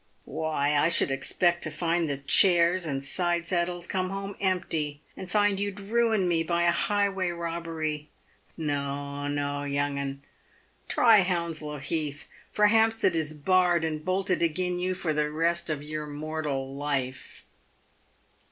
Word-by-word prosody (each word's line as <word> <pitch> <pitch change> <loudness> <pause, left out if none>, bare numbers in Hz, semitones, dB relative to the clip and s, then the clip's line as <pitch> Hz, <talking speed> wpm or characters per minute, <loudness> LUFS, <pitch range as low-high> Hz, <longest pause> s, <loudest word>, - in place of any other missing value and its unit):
"Why 150 -1 -1
I 150 +3 +3
should 170 -4 +4
expect 170 +6 +1
to - - -1
find 170 -1 0
the 140 - -1
chairs 170 +4 +4
and 135 -2 -2
side 175 +3 0
saddlea 175 0 -1
come 185 -1 -1
home 195 0 -5
empty 160 -6 -1 0.2
and 185 - -8
find 205 0 +2
you'd 200 0 -3
ruined 220 -1 +1
me 170 -2 +2
by 170 +1 0
a 170 - +4
highway 195 0 0
robbery. 165 -3 -4 0.5
No, 145 -2 -3
no, 145 0 -2
young 140 0 -1
'un, 140 0 -5 0.6
try 225 -3 +5
Hounslow 170 -4 -2
Heath, 145 0 -3 0.2
for 210 - +3
Hampstead 225 -3 +3
is 155 -1 -2
barred 175 +1 +2
and 155 -1 -3
bolted 185 0 0
agin 180 +2 0
you 185 +1 -1
for 165 -3 -1
the 150 0 0
rest 170 +2 0
of 150 -2 -3
your 150 0 -5
mortal 145 -3 -4
life." 135 -2 -4
165 Hz, 145 wpm, -27 LUFS, 145-185 Hz, 0.6 s, try